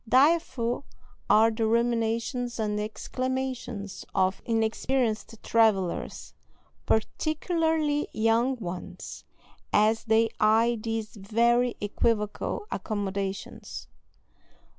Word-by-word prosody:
Direful 265 Hz, -3 st, +3 dB, 0.5 s
are 225 Hz, +1 st, +6 dB
the 220 Hz, 0 st, 0 dB
ruminations 235 Hz, +1 st, 0 dB
and 210 Hz, -1 st, 0 dB
exclamations 245 Hz, -1 st, -4 dB
of 190 Hz, 0 st, +2 dB
inexperienced 225 Hz, 0 st, 0 dB
travellers, 210 Hz, -6 st, +1 dB, 0.5 s
particularly 310 Hz, +4 st, +1 dB
young 225 Hz, +4 st, +2 dB
ones, 180 Hz, -6 st, -7 dB, 0.5 s
as 220 Hz, +2 st, +3 dB
they 225 Hz, 0 st, +3 dB
eye 225 Hz, +2 st, +4 dB
these 225 Hz, 0 st, -3 dB
very 235 Hz, +4 st, +2 dB
equivocal 210 Hz, -, -1 dB
accommodations. 200 Hz, -2 st, -4 dB
225 Hz, 75 wpm, -27 LUFS, 215-245 Hz, 0.5 s, are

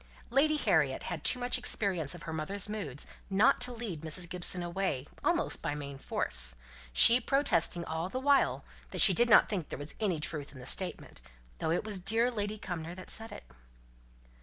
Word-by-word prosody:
Lady 295 Hz, +4 st, +3 dB
Harriet 150 Hz, -, +1 dB
had 170 Hz, -4 st, -6 dB
too -, -, +3 dB
much 250 Hz, 0 st, -1 dB
experience 185 Hz, -, +1 dB
of 170 Hz, -, -12 dB
her 160 Hz, -, -6 dB
mother's 185 Hz, +6 st, -2 dB
moods 190 Hz, -11 st, -5 dB, 0.2 s
not 195 Hz, +4 st, +3 dB
to 250 Hz, -, 0 dB
lead 225 Hz, -10 st, -6 dB
Mrs. 165 Hz, +2 st, 0 dB
Gibson 180 Hz, 0 st, +1 dB
away 175 Hz, -6 st, -3 dB, 0.2 s
almost 340 Hz, -1 st, 0 dB
by 145 Hz, -3 st, -3 dB
main 140 Hz, -2 st, -8 dB
force, -, -, +1 dB, 0.4 s
she 230 Hz, -, +7 dB
protesting 180 Hz, -, +1 dB
all 160 Hz, +3 st, -4 dB
the 255 Hz, -, -4 dB
while 280 Hz, +1 st, +1 dB, 0.2 s
that -, -, -4 dB
she 195 Hz, -, +9 dB
did 240 Hz, +6 st, +3 dB
not 215 Hz, -, +6 dB
think 185 Hz, -7 st, -4 dB
there -, -, -6 dB
was 145 Hz, +1 st, -5 dB
any 190 Hz, -7 st, -1 dB
truth 150 Hz, -2 st, -4 dB
in 140 Hz, -, -14 dB
the 125 Hz, -, -11 dB
statement, 180 Hz, -, -1 dB, 0.4 s
though -, -, -2 dB
it 165 Hz, -, 0 dB
was 205 Hz, -3 st, -3 dB
dear 225 Hz, +6 st, +2 dB
Lady 210 Hz, -2 st, -4 dB
Cumnor 175 Hz, -3 st, -6 dB
that 185 Hz, -, -10 dB
said 225 Hz, 0 st, -4 dB
it. -, -, -10 dB
180 Hz, 190 wpm, -30 LUFS, 160-225 Hz, 0.4 s, she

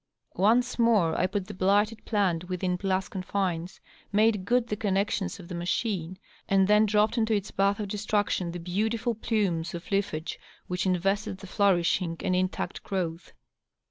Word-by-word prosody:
Once 240 Hz, +6 st, +3 dB
more 215 Hz, -9 st, +4 dB
I -, -, +2 dB
put 195 Hz, 0 st, -3 dB
the -, -, -8 dB
blighted 205 Hz, +4 st, +1 dB
plant 180 Hz, -5 st, 0 dB
within 180 Hz, 0 st, -1 dB
glass 190 Hz, 0 st, -1 dB
confines, 185 Hz, -2 st, -3 dB, 0.3 s
made 210 Hz, -2 st, +3 dB
good 245 Hz, +2 st, +2 dB
the 210 Hz, -, -3 dB
connections 200 Hz, -2 st, -1 dB
of 175 Hz, -, -10 dB
the 180 Hz, -, -7 dB
machine, 180 Hz, 0 st, -2 dB, 0.3 s
and 195 Hz, -1 st, +4 dB
then 210 Hz, +1 st, +5 dB
dropped 215 Hz, +3 st, +2 dB
into 220 Hz, -1 st, +2 dB
its 200 Hz, 0 st, -3 dB
bath 200 Hz, +1 st, +1 dB
of 210 Hz, -, -3 dB
destruction 205 Hz, -3 st, -1 dB
the 175 Hz, -, -5 dB
beautiful 215 Hz, +7 st, -1 dB
plumes 190 Hz, -7 st, -1 dB
of 170 Hz, +3 st, -9 dB
lea&ge 185 Hz, -5 st, -1 dB, 0.3 s
which 180 Hz, +1 st, -2 dB
invested 190 Hz, +2 st, 0 dB
the 195 Hz, -, -11 dB
flourishing 185 Hz, -3 st, +1 dB
and 185 Hz, -, 0 dB
intact 185 Hz, 0 st, -2 dB
growth. 175 Hz, -3 st, -3 dB
195 Hz, 160 wpm, -27 LUFS, 180-210 Hz, 0.3 s, then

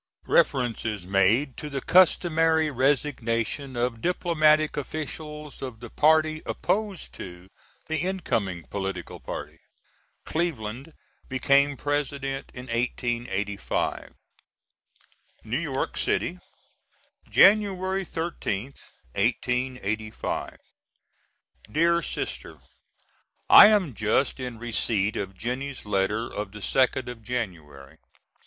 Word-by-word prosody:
Reference 120 Hz, -4 st, +2 dB
is 105 Hz, -5 st, -3 dB
made 100 Hz, +9 st, +2 dB
to 150 Hz, -, -6 dB
the 140 Hz, -1 st, -3 dB
customary 165 Hz, -2 st, +4 dB
resignation 130 Hz, -1 st, 0 dB
of 120 Hz, -1 st, -1 dB
diplomatic 155 Hz, -3 st, +3 dB
officials 150 Hz, +1 st, -6 dB
of 125 Hz, -4 st, -6 dB
the 120 Hz, -1 st, -10 dB
party 155 Hz, 0 st, +3 dB
opposed 205 Hz, -3 st, -2 dB
to 90 Hz, 0 st, -10 dB, 0.4 s
the 160 Hz, -, -2 dB
incoming 110 Hz, -, -1 dB
political 95 Hz, -2 st, -5 dB
party. -, -, -7 dB, 0.7 s
Cleveland 140 Hz, -3 st, -3 dB, 0.4 s
became 140 Hz, +2 st, +3 dB
President 140 Hz, -1 st, -2 dB
in 125 Hz, -, -9 dB
1885.] 115 Hz, -4 st, -2 dB, 1.3 s
New -, -, -2 dB
York -, -, -2 dB
City, -, -, 0 dB, 0.9 s
Jan'y 205 Hz, -1 st, +6 dB, 0.3 s
13th, 140 Hz, -, -4 dB, 0.4 s
1885. 120 Hz, -1 st, -2 dB, 1.1 s
DEAR 170 Hz, +2 st, +3 dB
SISTER: -, -, -4 dB, 0.9 s
I -, -, +11 dB
am 200 Hz, -, +2 dB
just 110 Hz, +6 st, +1 dB
in 125 Hz, -2 st, -5 dB
receipt 110 Hz, -3 st, 0 dB
of 95 Hz, -1 st, -4 dB
Jennie's 130 Hz, +4 st, -4 dB
letter 105 Hz, +2 st, +1 dB
of 105 Hz, -1 st, -6 dB
the 105 Hz, -, -9 dB
2nd 130 Hz, +2 st, +1 dB
of 120 Hz, -2 st, -7 dB
January. 85 Hz, -, -6 dB
130 Hz, 95 wpm, -26 LUFS, 110-155 Hz, 1.3 s, I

